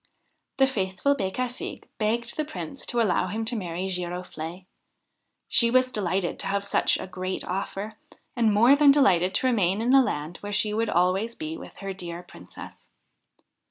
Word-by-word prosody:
The 270 - +6
faithful 210 +1 0
Becafigue 245 +4 -4
begged 235 +2 0
the 310 - -1
Prince 295 -2 -6
to 240 - 0
allow 185 -5 +2
him 220 +4 -3
to 235 +2 -2
marry 180 -2 -3
Giroflee. 180 -1 -5 0.8
She 235 -2 +4
was 255 +1 +3
delighted 190 -4 -1
to - - -3
have 200 +1 -1
such 200 - +2
a - - -6
great 185 0 -4
offer, 195 +3 -4 0.4
and 230 -3 +3
more 235 +7 +6
than 290 0 +5
delighted 190 -10 +4
to - - +1
remain 200 -6 +2
in 240 +3 +2
a 270 - +8
land 155 - -3
where 205 - -7
she 210 +1 +1
would 225 +1 0
always 190 +6 +1
be 320 0 -5
with - - -11
her 195 -1 -5
dear 175 -2 -5
Princess. 90 - -13
205 Hz, 170 wpm, -26 LUFS, 185-240 Hz, 0.8 s, a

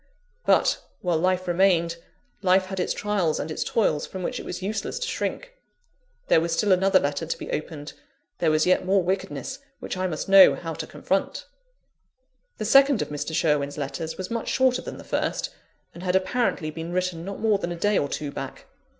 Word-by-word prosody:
But, - - +3 0.2
while 175 -3 +1
life 185 +1 +1
remained, 175 -2 +2 0.4
life 185 0 +4
had 190 0 -5
its 180 - 0
trials 200 -7 0
and 155 - -4
its - - -2
toils, 155 -10 +1
from 190 -1 -6
which - - -2
it - - -8
was 185 - -5
useless 215 - -3
to 485 0 -3
shrink. - - -3 0.7
There 160 - +5
was 165 0 -1
still 205 +4 +2
another 190 +1 +5
letter 145 +3 -2
to - - -2
be - - -7
opened: 150 -1 -5 0.5
there 165 - +2
was 155 0 +3
yet 185 0 +3
more 190 0 +2
wickedness 190 +3 -3 0.2
which - - -5
I 185 0 0
must 155 -4 -4
know 195 -1 +8
how 165 -2 -5
to - - -6
confront. 195 - -2 1.1
The 215 - -3
second 275 +2 +5
of - - -9
Mr. 150 +2 -4
Sherwin's 150 -3 +1
letters 150 +3 -4
was 185 +2 -5
much 230 -1 -3
shorter 260 -1 +2
than - - -7
the - - -10
first, - - -2 0.4
and 170 - -10
had 180 0 0
apparently 190 -4 0
been 165 +2 -6
written 180 -2 -1
not 195 +2 -6
more 215 -3 +2
than 175 -2 -3
a - - -3
day 205 +4 +2
or 140 - -1
two 145 0 -4
back. - - -7
185 Hz, 200 wpm, -25 LUFS, 160-195 Hz, 1.1 s, know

